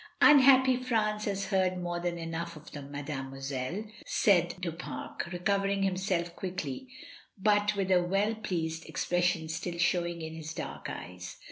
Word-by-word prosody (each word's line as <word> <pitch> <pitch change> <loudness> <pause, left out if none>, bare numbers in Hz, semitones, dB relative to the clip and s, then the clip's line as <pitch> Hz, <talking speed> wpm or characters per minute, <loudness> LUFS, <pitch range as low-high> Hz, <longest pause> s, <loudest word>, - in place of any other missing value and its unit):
"Unhappy 265 -3 +7
France 215 -4 0
has 195 -1 -1
heard 185 -2 +2
more 175 -1 -2
than 175 0 -2
enough 165 0 -4
of 150 - -12
them, 140 -1 -8
mademoiselle," 135 +3 -4 0.2
said 175 -4 +3
Du 180 -2 -2
Pare, 165 +2 -6 0.2
recovering 195 +2 +1
himself 185 -3 0
quickly, 180 - -4 0.5
but 205 +1 +3
with 195 -1 0
a 185 - +7
very 175 - -3
well 200 +4 +2
pleased 165 -6 -3
ex - - -2
pression 175 -2 +1
still 170 +2 -4
showing 175 -1 +1
in 160 0 -5
his 160 0 -7
dark - - -5
eyes. 90 0 -7
175 Hz, 155 wpm, -30 LUFS, 160-200 Hz, 0.5 s, Unhappy